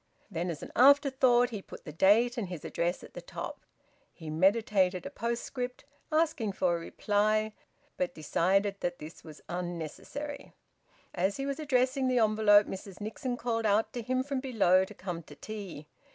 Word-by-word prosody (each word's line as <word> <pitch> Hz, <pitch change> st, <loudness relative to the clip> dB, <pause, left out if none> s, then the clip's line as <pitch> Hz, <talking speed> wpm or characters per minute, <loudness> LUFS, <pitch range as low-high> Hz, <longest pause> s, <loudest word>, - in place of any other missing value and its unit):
Then, 175 Hz, 0 st, -2 dB
as 160 Hz, -4 st, -5 dB
an -, -, -8 dB
afterthought, 260 Hz, -2 st, +5 dB
he 210 Hz, -3 st, -5 dB
put -, -, -12 dB
the 150 Hz, -, -6 dB
date 220 Hz, +8 st, +4 dB
and 220 Hz, -7 st, -3 dB
his 175 Hz, -5 st, -7 dB
address 175 Hz, +2 st, -1 dB
at -, -, -13 dB
the -, -, -7 dB
top. -, -, -7 dB, 0.5 s
He 160 Hz, -3 st, -8 dB
meditated 185 Hz, +1 st, +2 dB
a -, -, -5 dB
postscript 245 Hz, +2 st, -4 dB, 0.3 s
asking 310 Hz, -10 st, +1 dB
for 180 Hz, -2 st, +1 dB
a -, -, -3 dB
reply, 215 Hz, +4 st, 0 dB, 0.4 s
but 180 Hz, -, -1 dB
decided 195 Hz, +6 st, +1 dB
that 175 Hz, 0 st, -2 dB
this 155 Hz, +2 st, -10 dB
was 155 Hz, -2 st, -12 dB
unnecessary. 175 Hz, -, -5 dB, 0.6 s
As 190 Hz, +2 st, 0 dB
he 275 Hz, -, -3 dB
was 280 Hz, +2 st, -3 dB
addressing 260 Hz, -2 st, +1 dB
the 255 Hz, -1 st, +2 dB
envelope 215 Hz, -2 st, +5 dB
Mrs 190 Hz, 0 st, -8 dB
Nixon 245 Hz, +4 st, -4 dB
called 230 Hz, -2 st, -1 dB
out 210 Hz, +2 st, +2 dB
to 240 Hz, -, -3 dB
him 255 Hz, +3 st, 0 dB
from 275 Hz, -1 st, -2 dB
below 205 Hz, -8 st, +3 dB
to -, -, -12 dB
come 180 Hz, -3 st, -5 dB
to 150 Hz, -2 st, -14 dB
tea. 195 Hz, -6 st, -7 dB
210 Hz, 170 wpm, -30 LUFS, 180-245 Hz, 0.6 s, afterthought